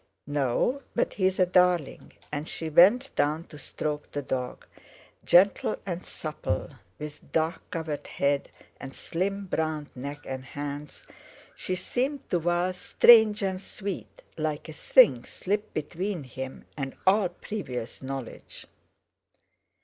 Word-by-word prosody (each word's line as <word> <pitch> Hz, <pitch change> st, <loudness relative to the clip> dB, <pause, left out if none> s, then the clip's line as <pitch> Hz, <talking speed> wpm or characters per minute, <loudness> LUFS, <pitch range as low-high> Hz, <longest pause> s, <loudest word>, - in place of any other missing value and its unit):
"No! 145 Hz, -, 0 dB
but -, -, +1 dB
he's 190 Hz, -1 st, +1 dB
a 185 Hz, -, +5 dB
darling," 180 Hz, -4 st, +2 dB, 0.2 s
and 150 Hz, +1 st, -3 dB
she 160 Hz, -, -4 dB
bent 200 Hz, -, +5 dB
down 150 Hz, +3 st, +1 dB
to 150 Hz, -, -11 dB
stroke 150 Hz, +1 st, -4 dB
the 145 Hz, -, -3 dB
dog. 125 Hz, -1 st, -3 dB, 0.6 s
Gentle 195 Hz, +4 st, +4 dB
and 180 Hz, -2 st, -4 dB
supple, 150 Hz, -9 st, -4 dB, 0.3 s
with 150 Hz, 0 st, -9 dB
dark 160 Hz, +2 st, 0 dB
covered 160 Hz, -3 st, -4 dB
head 140 Hz, 0 st, 0 dB, 0.3 s
and 135 Hz, 0 st, -8 dB
slim 195 Hz, +3 st, -2 dB
browned 155 Hz, -4 st, -2 dB
neck 140 Hz, +3 st, -6 dB
and 130 Hz, -1 st, -4 dB
hands, 145 Hz, +2 st, -6 dB, 0.5 s
she 185 Hz, -, -2 dB
seemed 260 Hz, +9 st, -2 dB
to 175 Hz, -, +3 dB
Val 175 Hz, +2 st, +1 dB
strange 220 Hz, +2 st, +6 dB
and 190 Hz, -1 st, -1 dB
sweet, 200 Hz, -1 st, -6 dB, 0.2 s
like 155 Hz, 0 st, -2 dB
a 160 Hz, -, -7 dB
thing 150 Hz, -, +5 dB
slipped 205 Hz, +3 st, -3 dB
between 175 Hz, +3 st, -3 dB
him 130 Hz, +1 st, -7 dB
and 135 Hz, -2 st, -4 dB
all 190 Hz, 0 st, +4 dB
previous 150 Hz, -, -6 dB
knowledge. 135 Hz, -2 st, -7 dB
160 Hz, 130 wpm, -28 LUFS, 145-190 Hz, 0.6 s, strange